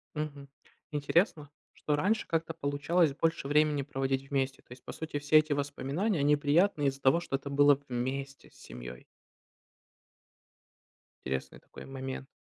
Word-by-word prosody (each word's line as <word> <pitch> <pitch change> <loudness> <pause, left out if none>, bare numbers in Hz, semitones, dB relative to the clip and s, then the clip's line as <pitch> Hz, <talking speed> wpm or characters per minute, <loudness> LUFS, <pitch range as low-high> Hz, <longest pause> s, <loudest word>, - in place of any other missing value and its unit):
Мгм. 145 -2 -5 0.4
Интересно, 150 +1 +1 0.2
что 150 - -1
раньше 210 +8 +1
как-то 165 0 -1
получалось 150 +1 +1
больше 160 -1 -1
времени 150 -1 +3
проводить 135 -1 -2
вместе, 135 -1 -1
то - - -32
есть, 125 0 -11
по - - -7
сути, 160 -2 -4
все 145 +2 +4
эти 155 0 -2
воспоминания, 145 +7 -1
они 145 +1 +4
приятные 150 +1 +2
из-за 135 0 -2
того, 135 +5 +4
что 170 -5 -3
это 140 +1 -5
было 145 +1 +5
вместе 135 +3 -4
с - - -26
семьёй. 60 0 -10 2.2
Интересный 65 0 -4
такой - - -12
момент. 135 0 -6
145 Hz, 145 wpm, -30 LUFS, 135-155 Hz, 2.2 s, было